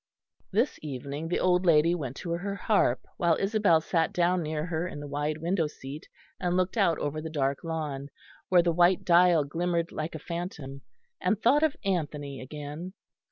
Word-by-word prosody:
This 225 +8 +1
evening 145 +2 -5
the 175 - 0
old 180 0 +3
lady 165 -1 +5
went 135 -7 -4
to 170 - -5
her 195 +4 -2
harp, 205 +2 +2 0.2
while 170 -2 +3
Isabel 195 -5 +3
sat 165 0 0
down 180 +1 +2
near 155 -1 -2
her 175 0 -2
in 150 - -7
the 145 - -6
wide 145 +2 -2
window 165 0 0
seat 145 0 -9 0.3
and 180 -1 0
looked 185 +3 0
out 190 -8 +3
over 145 +1 -3
the 160 - -5
dark 140 -3 -1
lawn, 150 -4 -4 0.4
where 180 -2 +5
the 170 - +2
white 175 +2 +3
dial 175 -2 +5
glimmered 170 +3 -1
like 155 +1 -4
a 155 - -9
phantom, 165 -6 -5 0.4
and 215 - +1
thought 270 +7 +4
of 315 -3 +2
Anthony 150 -7 -2
again. 150 +6 -7
165 Hz, 180 wpm, -28 LUFS, 150-180 Hz, 0.4 s, lady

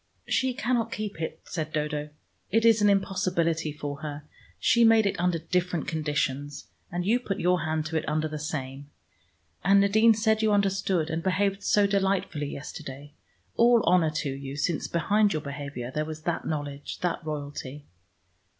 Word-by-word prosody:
"She 260 -1 +1
cannot 230 -1 0
keep 210 -6 -5
it," 160 - -4
said 155 -3 -4
Dodo. 150 -1 -2 0.4
"It 225 +3 +2
is 225 -2 +5
an 205 - +5
impossibility 180 -5 +1
for 145 -1 -5
her. 150 -1 -6 0.3
She 235 -2 +4
made 225 -1 +6
it 200 - -1
under 180 -1 +1
different 175 0 -1
conditions, 145 -2 -2 0.3
and 175 0 -2
you 230 +5 +3
put 200 -6 -4
your 180 0 +2
hand 155 -1 -1
to 160 0 -2
it 155 - -2
under 155 +1 0
the 155 0 -5
same. 140 -2 -5 0.7
And 195 +2 +5
Nadine 220 +3 +5
said 220 0 +2
you 215 -1 +3
understood, 195 -5 +1
and 160 +1 -1
behaved 195 +2 0
so 205 0 +3
delightfully 195 -6 0
yesterday. 145 0 -8 0.4
All 235 -1 +5
honor 175 -2 +4
to 140 - -2
you, 135 0 -7
since 155 +2 -1
behind 205 +5 +2
your 155 - -2
behavior 140 -3 -6
there 150 - 0
was 155 0 -7
that 170 0 -2
knowledge, 145 -2 -4
that 175 -2 -1
royalty." 145 -2 -6
165 Hz, 170 wpm, -27 LUFS, 150-200 Hz, 0.7 s, made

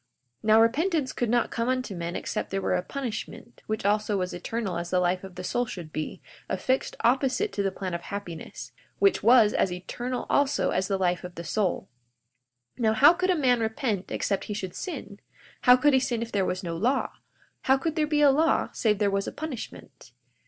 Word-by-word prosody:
42:16 - - -6
Now, 220 +1 +7
repentance 290 +4 +1
could 240 - -1
not 240 0 +1
come 230 +1 -1
unto 255 -6 -1
men 170 0 -4
except - - -3
there 195 - -1
were 190 - 0
a - - +1
punishment, 240 0 -6
which 215 -2 -3
also 210 0 +1
was 180 -1 -2
eternal 190 0 -3
as 170 0 -5
the 180 - +2
life 180 +1 0
of 190 -2 -10
the 180 - -6
soul 245 +6 -1
should 170 -7 -8
be, 155 - -5 0.3
affixed 260 +1 -1
opposite 270 - +1
to 205 - -1
the 195 - +1
plan 185 -1 -5
of 170 - -3
happiness, 175 -4 -7 0.3
which 395 -1 +3
was 230 -2 +6
as 190 - +1
eternal 240 +8 -4
also 285 0 +2
as 185 +1 0
the 195 - 0
life 180 -1 0
of 180 -1 -8
the 170 - -6
soul. 190 +2 -1 0.9
42:17 - - -5
Now, 220 -1 +3
how 285 +9 +7
could 365 +2 -1
a 365 - +4
man 250 -5 +3
repent 220 -3 -2
except 195 -2 -1
he 210 - -4
should 190 -3 -5
sin? 245 - -6 0.5
How 250 -1 +8
could 290 +3 +3
he 265 - +5
sin 240 -3 -1
if 230 - -8
there 195 -2 +1
was 185 +1 -2
no 170 -1 -3
law? 245 +10 0 0.5
How 265 +1 +5
could 315 +3 -2
there 310 -2 +1
be 300 -1 +1
a 285 -1 +7
law 315 +4 +2
save 215 -3 +1
there 200 -1 +1
was 195 0 -1
a - - -3
punishment? 295 -7 -8
220 Hz, 215 wpm, -27 LUFS, 190-260 Hz, 0.9 s, How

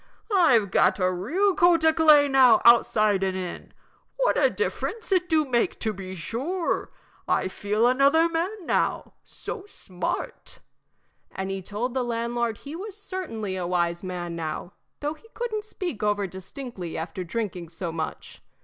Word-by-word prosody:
"I've 240 - +4
got - - +4
a 185 -2 +2
real 355 - +1
coat 345 -3 +4
o' 320 - +6
clay 305 -3 +6
now 260 -4 +6
outside 215 -4 +5
and 190 -1 0
in 180 -2 -6 0.5
what - - +2
a - - +4
difference 445 -1 -3
it 360 -1 +2
do 315 -2 +3
make, 245 -3 0
to 220 -2 -1
be 190 -1 -7
sure. 280 - -2 0.4
I - - +1
feel 205 +4 0
another 280 +6 +4
man 345 +4 -3
now - - 0
so 405 -3 -8
smart." 185 - -5 0.7
And 190 0 -4
he 195 0 -3
told 215 +6 -3
the 260 - 0
landlord 235 -1 -1
he 290 +3 -9
was 400 +3 -7
certainly 315 - -5
a 180 -2 -3
wise 170 -1 0
man 175 -2 -5
now, 165 +2 -5 0.3
though 295 +1 -1
he 385 +8 -19
couldn't 435 -3 -3
speak 355 - -5
over 205 -1 +1
distinctly 190 0 -7
after 175 +3 -4
drinking 180 -3 -4
so 170 +1 -5
much. 160 -1 -6
235 Hz, 160 wpm, -25 LUFS, -, 0.7 s, o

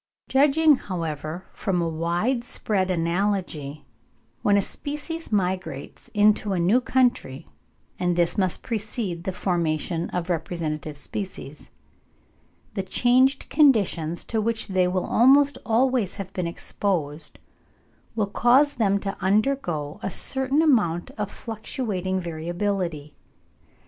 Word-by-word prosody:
Judging, 290 +2 +5
however, 165 - -5
from 190 -4 -1
a 170 - 0
wide 175 +10 0
spread 200 -6 -1
analogy, 170 -4 -1 0.6
when 205 -1 +4
a - - +4
species 300 - -6
migrates 185 -8 -2
into 210 -1 +3
a 180 - 0
new 195 +9 +3
country 245 - +1 0.5
(and 180 -1 +1
this 170 -1 +2
must 185 -3 0
precede 210 -6 -3
the 190 - -1
formation 170 -2 -1
of 180 -1 -3
representative 155 -3 -3
species), 150 -4 -7 1.0
the - - -1
changed 250 +7 +2
conditions 200 - +3
to 220 -1 -1
which 225 0 -1
they 185 -1 +2
will 185 0 -1
almost 275 +4 +5
always 240 -3 +2
have 195 -2 -7
been 180 -2 -2
exposed 165 -4 -3 0.8
will 215 -2 +1
cause 250 +8 +4
them 200 -6 +2
to 195 0 -4
undergo 190 - 0
a - - -2
certain 265 - 0
amount 205 - +2
of 210 -2 -4
fluctuating 210 -5 -3
variability. 170 -2 -3
190 Hz, 120 wpm, -24 LUFS, 170-235 Hz, 1.0 s, Judging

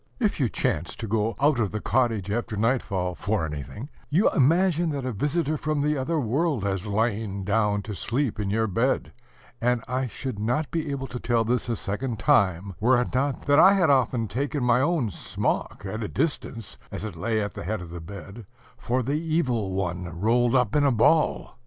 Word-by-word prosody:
If 215 -8 0
you 130 -5 +2
chance 90 -11 -1
to 115 - -5
go 110 +1 0
out 145 -2 +3
of 105 -4 +1
the 105 - -3
cottage 115 -5 0
after 115 0 -2
nightfall 100 -6 0
for 100 -1 -1
anything, 80 - -7 0.2
you 175 +9 +3
imagine 170 +3 +3
that 140 -4 -3
a 130 - -1
visitor 150 - 0
from 150 0 -1
the 150 +1 +1
other 155 +4 -1
world 140 - 0
has 100 0 -2
lain 105 -2 -1
down 105 0 +1
to 105 - -6
sleep 120 - -1
in 100 -2 -1
your 110 +2 +1
bed; 115 +6 0 0.5
and 125 0 +1
I 130 +1 -1
should 120 0 -5
not 125 +8 -1
be 160 -3 -2
able 140 -1 -3
to 125 -2 -6
tell 115 -2 +1
this 120 +1 0
a 115 - +1
second 110 +4 -3
time 95 -2 +2
were 120 +3 +4
it 125 - -2
not 135 +1 -1
that 145 +1 +5
I 195 - +8
had 180 -6 +4
often 125 -4 +2
taken 140 +5 -2
my 125 +1 +4
own 145 -7 +1
smock, 90 - -2
at 110 +4 -4
a 105 - -2
distance, 125 -7 -3
as 95 - -5
it 105 -5 -6
lay 110 +7 -1
at 105 -1 -3
the - - -7
head 105 +4 -2
of 85 -2 -9
the 85 -1 -7
bed, 100 +4 -10 0.3
for 125 +2 -1
the 135 +4 -1
Evil 130 - 0
One 90 -2 -2
rolled 120 +4 +3
up 125 -2 +2
in 145 - +4
a 140 - +4
ball! 140 +4 +2
120 Hz, 205 wpm, -25 LUFS, 105-140 Hz, 0.5 s, I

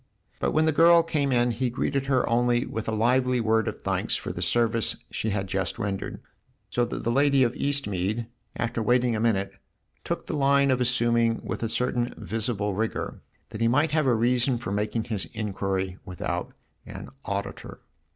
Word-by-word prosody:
But - - +1
when 155 +1 +3
the 160 - +4
girl 170 +2 +6
came 145 -4 0
in 120 -1 +3
he 120 +2 -1
greeted 135 +2 -1
her 130 -2 +2
only 120 +1 +2
with 110 0 -5
a - - 0
lively 125 +3 +2
word 110 -1 +2
of - - -5
thanks - - 0
for - - -4
the - - -6
service 115 -2 +1 0.2
she 110 - -2
had 100 -1 -1
just 95 0 -2
rendered; 100 -1 -4 0.5
so 120 - +2
that 120 - -5
the 115 - +1
lady 140 +1 +4
of 120 -1 +1
Eastmead, 115 -7 -1 0.3
after 120 -1 -2
waiting 120 +1 +2
a - - -1
minute, 105 -4 +1 0.5
took - - -3
the - - -3
line 140 -1 +4
of 130 -1 +1
assuming 120 -2 +2
with - - -4
a 115 - -1
certain 125 0 -1
visible 105 0 -2
rigour 110 +3 -3 0.3
that 105 - -7
he 115 - +4
might 145 +6 +2
have 155 -3 +2
a 120 - +4
reason 125 +2 +2
for 115 -5 -5
making 105 +2 -1
his 105 -5 -2
inquiry 95 -3 -2
without 90 -2 -4 0.3
an - - -9 0.2
auditor. 100 0 -5
120 Hz, 185 wpm, -26 LUFS, 110-130 Hz, 0.5 s, girl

